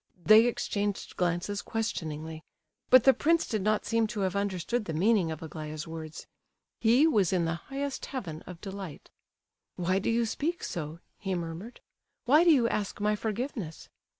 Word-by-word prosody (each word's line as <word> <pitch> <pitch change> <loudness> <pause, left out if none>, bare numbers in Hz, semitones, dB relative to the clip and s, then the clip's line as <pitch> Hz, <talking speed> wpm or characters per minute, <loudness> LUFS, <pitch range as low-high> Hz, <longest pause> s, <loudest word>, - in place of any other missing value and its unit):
They 220 +2 +8
exchanged 205 -4 -2
glances 180 +3 -1
questioningly, 160 -8 -4 0.5
but 255 -2 +8
the 270 - +7
prince 330 +4 +2
did 215 -3 -1
not 215 +2 +1
seem 230 -1 +2
to 210 -1 -4
have 190 0 0
understood 200 +3 -1
the 160 - -4
meaning 195 0 +3
of 160 0 -5
Aglaya's 155 0 -6
words; 160 -1 -7 0.5
he 240 +6 +5
was 210 - +3
in 180 -3 +2
the 165 - 0 0.2
highest 275 0 -3
heaven 180 - -5
of 180 -2 -9
delight. 195 -6 -8 0.6
"Why 185 +2 +1
do - - -1
you 230 0 +2
speak 320 +9 -2
so?" 160 0 -5 0.2
he 190 -2 -2
murmured. 170 +7 -6 0.4
"Why 295 +7 +6
do 350 - +5
you 255 -6 +4
ask 210 -3 -2
my 210 +1 +2
forgiveness?" 215 - -4
200 Hz, 165 wpm, -29 LUFS, 165-230 Hz, 0.6 s, They